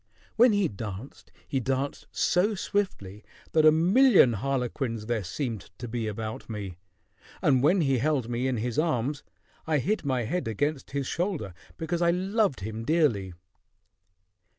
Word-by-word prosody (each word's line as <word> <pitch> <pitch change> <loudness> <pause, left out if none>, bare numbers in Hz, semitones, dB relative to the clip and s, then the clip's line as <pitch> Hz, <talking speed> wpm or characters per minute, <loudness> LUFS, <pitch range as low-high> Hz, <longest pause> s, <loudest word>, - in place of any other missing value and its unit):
When 240 +1 +6
he 205 -3 +2
danced, 105 +4 -8 0.2
he 135 - -1
danced 135 +2 -2
so 205 +5 +2
swiftly 120 - -3 0.3
that 155 -1 +5
a - - +9
million 185 - +5
harlequins 125 -1 -2
there 115 -2 -1
seemed 115 - -4
to 120 - -6
be 115 -1 -3
about 110 +2 -5
me: 100 -5 -6 0.6
and 130 -4 +3
when 170 +7 +4
he 135 -4 +2
held 140 -3 0
me 120 +2 -1
in 130 -2 0
his 120 +5 -1
arms, 145 -3 0 0.5
I 155 -1 +2
hid 205 - 0
my 130 -4 0
head 175 +9 -2
against 145 +6 -2
his 140 -1 -2
shoulder, 165 - -2 0.2
because 170 +1 -2
I 170 - +4
loved 190 - +1
him 110 +3 -5
dearly." 115 - +1
135 Hz, 150 wpm, -27 LUFS, 115-165 Hz, 0.6 s, a